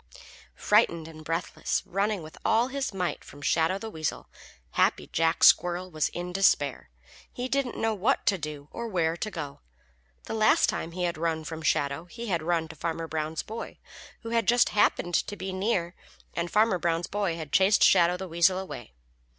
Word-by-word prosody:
_ - - -14 0.3
Frightened 170 -7 +2
and 155 -1 -11
breathless, 165 +3 -2
running 195 0 -1
with 155 - -11
all 230 +3 +2
his 275 -1 -2
might 180 -3 -3
from 145 - -13
Shadow 165 +5 +2
the 220 +2 -7
Weasel, 155 -4 -4 0.4
Happy - - +2
Jack 165 +1 0
Squirrel 180 +1 +5
was 155 -2 0
in 175 +1 -6
despair. 145 - +2 0.4
He 250 +1 -4
didn't 270 -2 -1
know 225 0 0
what 215 +7 0
to 195 -4 +2
do 150 -2 -6
or 235 - -5
where 170 -6 0
to 215 - -3
go. 150 -8 -6 0.6
The - - -6
last 220 -1 +4
time 165 - -3
he 180 0 -3
had 170 -2 -1
run 160 -1 -1
from 160 +1 -6
Shadow 140 +1 0
he 230 +7 -8
had 170 -4 0
run 165 0 0
to 160 - -10
Farmer 165 +1 -3
Brown's 155 0 -3
boy, 225 +2 -7 0.4
who 230 - -7
had 230 -3 +1
just 240 +1 +4
happened 175 -4 +1
to 205 - 0
be 190 0 -5
near, 185 -3 -1 0.4
and 170 0 -2
Farmer 210 -2 +3
Brown's 170 +1 0
boy 200 -4 -1
had 155 -3 -7
chased 195 +2 +5
Shadow 175 -1 +5
the 190 +1 -6
Weasel 170 +2 +3
away. 185 - -7
175 Hz, 190 wpm, -27 LUFS, 160-205 Hz, 0.6 s, Squirrel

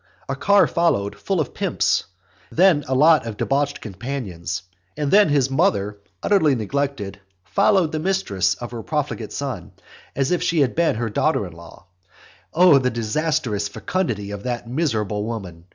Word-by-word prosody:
A - - -2
car 200 -1 +4
followed 100 -13 0
full 195 -3 -2
of 150 - -2
pimps; - - 0 0.5
then 170 -4 +4
a 130 - 0
lot 155 -2 +5
of 110 -3 -6
debauched 145 +1 0
companions; 95 -6 -5 0.3
and 150 -2 -1
then 205 -3 +6
his 135 -2 +2
mother, 120 - +1 0.2
utterly 160 -9 +3
neglected, 115 -4 -3 0.3
followed 175 - +2
the 155 - -2
mistress 125 - 0
of 120 +3 -8
her 120 -2 -5
profligate - - -3
son, - - -5 0.4
as 135 +2 0
if 180 - +1
she 170 -3 +2
had 135 - +2
been 170 -6 +2
her 115 -1 -2
daughter 130 -1 +1
in 90 - -9
law. 85 +1 -14 0.7
O 175 -4 +6
the 125 -1 +1
disastrous 120 -2 -1
fecundity 105 - -3
of 100 -1 -6
that 120 0 -4
miserable 110 - -1
woman! 95 -7 -6
130 Hz, 160 wpm, -22 LUFS, 105-160 Hz, 0.7 s, then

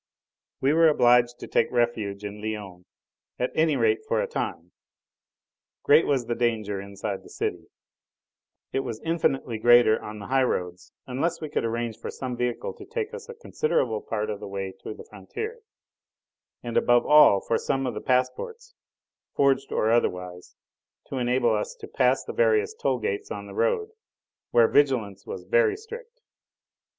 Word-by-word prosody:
We 135 +2 +3
were 165 +1 +6
obliged 120 -4 +4
to - - -6
take - - +2
refuge 110 -4 -1
in 105 +1 -7
Lyons, 100 -5 -6 0.5
at 125 - -1
any 155 -1 +2
rate 425 -1 +2
for 480 - +1
a - - +1
time. 470 - -4 1.1
Great 445 - +5
as - - -3
was 135 -4 +1
the 120 - -1
danger 110 -4 -1
inside 100 0 -5
the - - -16
city, - - -4 1.1
it - - +1
was 120 -5 -4
infinitely 135 -8 -1
greater 120 -1 +5
on 105 0 -7
the 100 - -8
high 135 +3 +2
roads, 90 -7 -2
unless 135 +7 -2
we 155 - -5
could - - -1
arrange 115 -1 -3
for - - -6
some 130 -2 -5
vehicle 125 0 -2
to - - -10
take 455 -1 -4
us 470 -1 -9
a 475 - -8
considerable 280 - -1
part 110 -1 -3
of 105 - -5
the 105 - -7
way 95 -1 -5
to 110 - -7
the - - -11
frontier, 440 - -7 1.0
and 120 -1 -2
above 120 0 +4
all 150 -10 +7
for 115 - -1
some 135 0 -1
sort 125 -4 -3
of - - -6
passports 135 - -1 0.6
forged 135 -1 +2
or 110 - +1
otherwise 90 -6 -1 0.5
to 135 - -3
enable 120 -1 +2
us 105 - -2
to 440 -3 -10
pass - - +2
the - - -7
various 445 -3 +2
toll 455 - 0
gates 425 -2 -3
on - - -6
the - - -10
road, 455 -1 0 0.6
where 120 -1 +5
vigilance 115 -10 +1
was - - -6
very 465 -4 +2
strict. 465 +3 -11
125 Hz, 170 wpm, -26 LUFS, -, 1.1 s, all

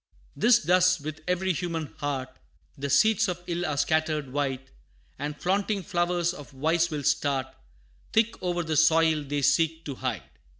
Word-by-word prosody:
'Tis 240 0 +5
thus 185 0 +4
with 155 +2 -7
every 180 +1 +1
human 165 -1 -3
heart; 130 -3 -4 0.4
The 140 -1 -4
seeds 210 +10 +4
of 175 -1 -4
ill 175 0 -2
are 150 -2 -2
scattered 155 -2 0
wide, 135 -2 -2 0.5
And 145 +1 -4
flaunting 200 +2 0
flowers 175 0 0
of 145 -5 -11
vice 160 +5 +1
will 150 -3 -4
start 140 -2 0 0.6
Thick 225 +1 +1
o'er 175 -1 -1
the 160 -1 -1
soil 160 0 +4
they 145 0 -3
seek 165 +2 +2
to 140 - -4
hide. 125 - -3
160 Hz, 160 wpm, -27 LUFS, 145-175 Hz, 0.6 s, Tis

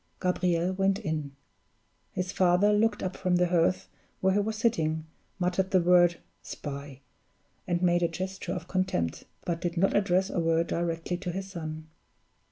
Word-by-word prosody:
Gabriel 180 -1 +1
went 195 0 +2
in. 155 -8 -4 0.8
His 185 0 -3
father 185 +3 +4
looked 210 0 +2
up 185 0 -3
from 180 -1 +1
the 180 0 +2
hearth 180 +1 +2 0.3
where 190 0 +2
he 205 - +3
was 215 +2 -1
sitting, 160 -9 0 0.3
muttered 185 0 0
the 185 - +4
word 175 -1 +5 0.2
"Spy!" 140 -2 -7 0.7
and 175 0 0
made 175 -1 +3
a 170 - +3
gesture 185 +1 -4
of 180 -2 -5
contempt 185 - -1 0.2
but 170 -1 -2
did 175 0 -2
not 195 +3 +2
address 190 -1 +2
a - - -1
word 165 0 +2
directly 170 +1 -2
to 180 0 -4
his 190 +2 -5
son. 155 -3 -6
180 Hz, 165 wpm, -28 LUFS, 165-190 Hz, 0.8 s, word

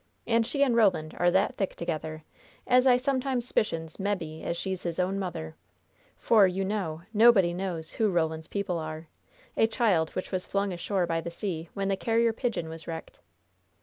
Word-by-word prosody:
And 230 -1 +2
she 280 -1 +1
and 255 -4 +2
Roland 175 -9 +2
are 175 - +4
that 190 +3 +1
thick 195 - -2
together 155 -2 -4 0.4
as 250 +1 +4
I 250 -1 +6
sometimes 260 -1 -1
s'picions 165 -8 -1
mebbe 180 -6 -3
as 170 - -2
she's 190 0 -3
his 170 -2 -4
own 185 +2 0
mother; 165 -4 -5 0.6
for, 210 -4 +5
you 190 +1 -2
know, 180 -6 -3
nobody 210 -6 +6
knows 175 -3 -4
who 220 -2 +1
Roland's 160 -3 -1
people 200 -4 -2
are 155 0 -6 0.5
a 225 - +4
child 205 -9 +2
which 185 - -4
was 185 -1 -1
flung 200 -1 -1
ashore 180 +1 -1
by 165 -1 -1
the 170 - -5
sea 170 -2 -4
when 195 0 -1
the 195 - +1
Carrier 230 +3 +2
Pigeon 225 -8 -2
was 160 0 -9
wrecked." 165 -1 -7
185 Hz, 180 wpm, -28 LUFS, 165-215 Hz, 0.6 s, I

